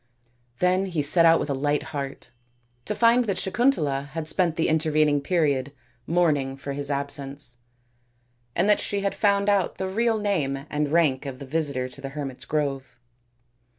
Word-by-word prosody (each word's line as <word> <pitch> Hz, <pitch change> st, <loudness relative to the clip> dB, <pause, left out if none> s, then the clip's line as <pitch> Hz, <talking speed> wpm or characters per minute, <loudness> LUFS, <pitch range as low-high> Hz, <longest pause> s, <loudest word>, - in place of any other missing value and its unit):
Then 185 Hz, +3 st, +1 dB
he 165 Hz, -5 st, -2 dB
set 165 Hz, +4 st, +6 dB
out 165 Hz, 0 st, +5 dB
with 145 Hz, -, -3 dB
a -, -, +1 dB
light 145 Hz, +2 st, 0 dB
heart, 140 Hz, -3 st, -6 dB, 0.5 s
to 210 Hz, -, -2 dB
find 235 Hz, +2 st, +4 dB
that 195 Hz, -4 st, -2 dB
Sakun 235 Hz, +8 st, +2 dB
tala 140 Hz, -, -3 dB
had 160 Hz, -1 st, -4 dB
spent 170 Hz, -1 st, +2 dB
the 160 Hz, -, 0 dB
intervening 155 Hz, -2 st, +2 dB
period 145 Hz, -4 st, 0 dB, 0.3 s
mourning 145 Hz, -6 st, +1 dB
for 140 Hz, 0 st, -6 dB
his 140 Hz, 0 st, -3 dB
absence, 140 Hz, -2 st, -1 dB, 0.9 s
and 175 Hz, +4 st, +2 dB
that 210 Hz, -, +4 dB
she 200 Hz, -1 st, -2 dB
had 200 Hz, 0 st, -1 dB
found 200 Hz, -1 st, +1 dB
out 200 Hz, -3 st, +1 dB
the 190 Hz, -, -3 dB
real 225 Hz, +3 st, +1 dB
name 150 Hz, -10 st, -1 dB
and 150 Hz, -1 st, -1 dB
rank 150 Hz, -5 st, +2 dB
of 130 Hz, -2 st, -6 dB
the 140 Hz, -, -9 dB
visitor 140 Hz, -3 st, 0 dB
to 130 Hz, +2 st, -11 dB
the 135 Hz, -, -5 dB
hermits' 135 Hz, -2 st, -6 dB
grove. 140 Hz, -4 st, -3 dB
150 Hz, 175 wpm, -25 LUFS, 140-185 Hz, 0.9 s, set